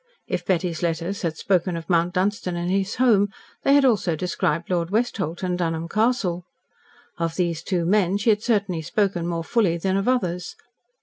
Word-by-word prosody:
If - - -3
Betty's 175 -3 -1
letters 170 +3 -2
had 160 -3 -2
spoken 180 -2 +1
of 165 - -8
Mount 175 +1 +1
Dunstan 185 -1 0
and 175 +1 -2
his 195 +1 0
home, 215 -5 +4 0.3
they 275 - +4
had 285 -1 +5
also 205 -9 +2
described 170 0 -1
Lord 170 -2 0
Westholt 195 -6 -1
and 180 -1 -1
Dunholm 165 -1 -1
Castle. 210 -4 0 0.8
Of 165 -1 -1
these 170 -3 -1
two 175 -1 -1
men 195 0 +2
she 215 +3 +3
had 210 0 +1
certainly 200 -8 0
spoken 180 0 0
more 170 -1 -2
fully 185 -3 +1
than 190 +3 0
of 195 - -1
others. 180 -9 -1
180 Hz, 180 wpm, -23 LUFS, 170-205 Hz, 0.8 s, had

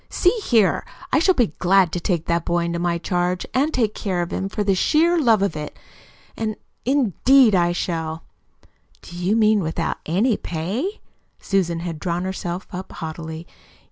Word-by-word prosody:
See 360 - +3
here, 225 - +3 0.3
I - - +5
shall 370 +3 +3
be 235 - +1
glad 185 -1 +4
to 175 - -2
take 170 -2 -1
that 170 -1 0
boy 175 0 0
into 170 0 -2
my 170 0 0
charge 180 +1 -1
and 280 +4 +2
take 225 -7 0
care 185 -4 -2
of 175 - -6
him 195 - -2
for 210 +1 -2
the 200 -1 +2
sheer 330 - +3
love 225 -8 +4
of 200 -6 -1
it 150 -1 -6 1.1
indeed, 260 - +4
I 175 -2 +3
shall!" 165 -2 -3 0.8
"Do 175 - -11
you 180 +4 0
mean 215 -1 +4
without 160 -4 -2
ANY 205 +8 +2
pay?" 200 - -3 0.4
Susan 175 -4 0
had 170 -3 -5
drawn 175 +2 -2
herself 185 -1 -4
up 185 0 -7
haughtily. 160 0 -6
185 Hz, 170 wpm, -22 LUFS, 170-220 Hz, 1.1 s, I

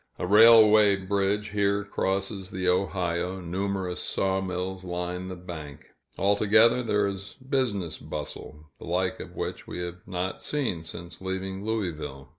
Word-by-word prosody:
A - - -2
railway 110 0 +7
bridge 100 +2 0
here 100 0 +1
crosses 95 -1 -2
the 95 -1 -3
Ohio, 90 -1 0
numerous 95 +1 -2
sawmills 95 -1 -1
line 90 0 -4
the 95 - -5
bank; 80 -5 -9 0.3
altogether, 110 +4 +4
there 105 -3 +1
is 100 0 -5
business 130 - -2
bustle, 75 0 -8
the - - -9
like 90 +2 -1
of - - -9
which - - -5
we - - -6
have 90 +1 -5
not 95 0 -3
seen 130 - -2
since 85 +2 -8
leaving 95 +1 -4
Louisville. 80 -11 -3
95 Hz, 135 wpm, -27 LUFS, 90-100 Hz, 0.3 s, railway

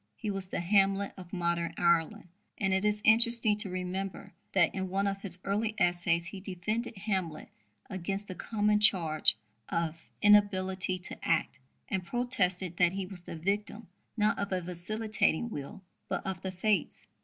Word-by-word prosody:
He 210 - -4
was 195 -1 -3
the 185 - -3
Hamlet 195 +2 +2
of 180 -2 -11
modern 170 -2 -1
Ireland. 170 0 +1 0.3
And 195 -2 0
it 190 +1 +1
is 210 0 +1
interesting 230 -1 +6
to 210 -2 +2
remember 185 +1 -4 0.2
that 175 -4 +3
in 190 -1 -3
one 195 +2 0
of 195 0 -2
his 180 -4 -2
early 215 +2 -1
essays 175 -1 +2
he 190 +2 -7
defended 205 +5 -4
Hamlet 190 -6 -3 0.4
against 195 +2 -3
the 185 - -5
common 210 +1 +1
charge 170 -7 +4 0.3
of 165 -1 -2 0.2
"inability 190 -3 +3
to 180 - -7
act," 165 -3 0 0.3
and 190 -3 -2
protested 185 -5 -1
that 175 0 +3
he 195 -1 -3
was 185 -1 -8
the 175 - -8
victim, 205 +6 -3 0.3
not 210 0 +2
of 200 0 -2
a 185 - +1
vacillating 215 +4 -1
will, 145 +6 -7 0.3
but - - -2
of 190 -3 -4
the 190 - -4
fates. 190 0 0
190 Hz, 165 wpm, -30 LUFS, 175-210 Hz, 0.4 s, interesting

